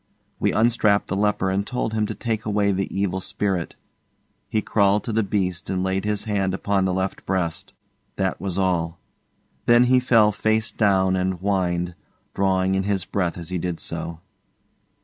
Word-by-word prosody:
We - - +2
unstrapped 110 -3 +2
the 95 - -1
leper 100 -2 +1
and 95 +1 0
told 120 0 -3
him 110 -1 0
to - - -5
take 115 -2 -2
away 105 -1 +1
the 95 0 -1
evil 95 -1 -1
spirit. 95 -2 -2 0.7
He 110 - +1
crawled 100 -1 +2
to 115 - -3
the 110 - +3
beast 95 -4 -2
and 95 -1 -1
laid 95 +1 -1
his 105 -1 -1
hand 100 -4 0
upon 100 -1 0
the 95 - 0
left 95 +1 -2
breast. 90 -4 -2 0.4
That 95 -3 -1
was 95 -1 -3
all. 90 -3 0 0.7
Then 120 +1 +6
he 125 +1 +4
fell 115 -4 +4
face 110 +1 0
down 95 -3 +2
and 95 0 0
whined, 90 -2 -1 0.4
drawing 95 -1 +1
in 95 - +2
his 95 -2 -1
breath 90 -3 -1
as 85 -1 -7
he 90 -1 -2
did 85 -1 -3
so. 85 0 -5
95 Hz, 175 wpm, -23 LUFS, 95-105 Hz, 0.7 s, Then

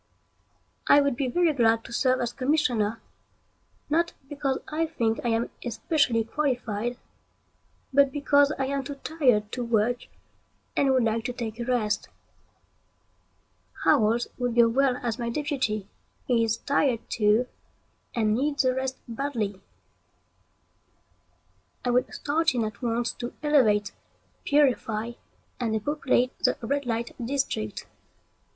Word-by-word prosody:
I 285 - +7
would 280 -3 +1
be 260 +1 -1
very 335 +4 +2
glad 225 -3 +3
to - - -10
serve 255 +1 +2
as 240 0 -2
commissioner, 250 -6 +1 0.9
not 335 +3 +1
because 275 -2 -1
I 320 +2 -1
think 230 -8 -1
I - - -1
am 230 +1 0
especially 240 -1 +1
qualified, 240 -3 -2 1.0
but 280 0 +5
because 285 0 +3
I 270 - 0
am 275 0 -2
too 280 +2 -6
tired 255 -9 +1
to 250 - -3
work 235 +1 0 0.7
and 275 - +3
would 260 -2 +3
like 225 0 0
to 250 - -2
take 230 -2 -5
a 235 - -3
rest. 235 -4 0 1.7
Howells 225 +2 +3
would 245 -2 -1
go 235 -1 +6
well 260 +1 +2
as 235 -1 -2
my 235 -1 -2
deputy. 235 -7 -2 0.4
He 235 -2 +2
is 225 0 0
tired 275 -4 0
too, 215 +2 +2 0.7
and 215 -2 +2
needs 280 +3 +1
a 255 - +3
rest 260 0 -2
badly. 230 -6 -3 2.2
I 245 - +2
would 250 +1 +1
start 315 0 0
in 235 - +1
at 215 -1 -7
once 235 0 0
to 240 0 -7
elevate, 220 -9 +3 0.5
purify, 240 -6 +2 0.5
and 230 -3 -1
depopulate 255 +1 0
the - - +2
red 280 +3 -1
light 230 0 -2
district. 235 - -2
245 Hz, 130 wpm, -26 LUFS, 225-280 Hz, 2.2 s, I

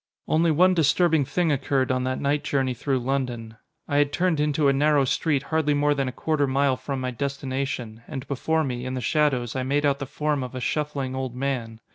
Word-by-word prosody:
Only 165 +2 +3
one 180 +4 +4
disturbing 160 -1 +3
thing 170 +3 0
occurred 135 -1 0
on 130 0 0
that 130 0 -1
night 145 +1 0
journey 135 -3 0
through 135 +3 -1
London. 120 -4 -3 0.3
I 145 - 0
had 145 0 +3
turned 175 0 +1
into 150 0 +2
a 140 - +4
narrow 145 0 +3
street 140 +1 0
hardly 150 -2 +2
more 145 0 +3
than 135 -2 -1
a - - -2
quarter 145 +2 0
mile 135 0 +2
from 135 +1 -4
my 130 0 -2
destination; 130 -3 -4
and 135 +1 -6
before 160 +4 0
me, 125 -3 -3
in 130 0 -4
the 130 - -3
shadows, 135 -5 +1
I 130 - -1
made 140 +3 0
out 140 -1 +2
the 140 - -4
form 150 0 -1
of 125 0 -6
a - - -3
shuffling 140 -1 -2
old 130 -2 -4
man. 125 -4 -3
140 Hz, 215 wpm, -25 LUFS, 130-150 Hz, 0.3 s, one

